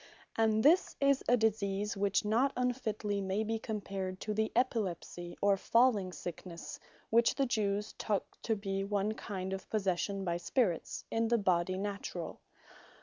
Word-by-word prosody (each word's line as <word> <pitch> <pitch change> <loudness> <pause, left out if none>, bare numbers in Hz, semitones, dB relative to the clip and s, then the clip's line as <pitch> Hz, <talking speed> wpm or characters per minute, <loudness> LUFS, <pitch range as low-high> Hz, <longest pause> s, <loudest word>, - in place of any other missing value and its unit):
And 220 -1 +3
this 335 +6 +5
is 275 -1 +3
a 245 - +6
Disease 210 -1 0
which 200 +1 +1
not 240 +6 +2
unfitly 220 -5 -1
may 195 +2 0
be 225 +1 -1
compared 195 -4 -4
to 215 - -2
the 220 +1 0
Epilepsie, 185 -7 -1
or 200 -1 +5
Falling 225 -4 +3
sicknesse 175 -1 -7 0.3
(which 230 +1 +4
the 275 - +2
Jewes 210 -3 0
took 205 -3 0 0.2
to 225 - 0
be 195 -1 -2
one 200 +1 0
kind 190 -3 -4
of 190 -1 -6
possession 195 -1 0
by 170 -1 0
Spirits) 175 -1 -1
in 225 0 +1
the 235 +1 +3
Body 185 -2 +1
Naturall. 195 -4 -4
205 Hz, 150 wpm, -33 LUFS, 190-225 Hz, 0.3 s, a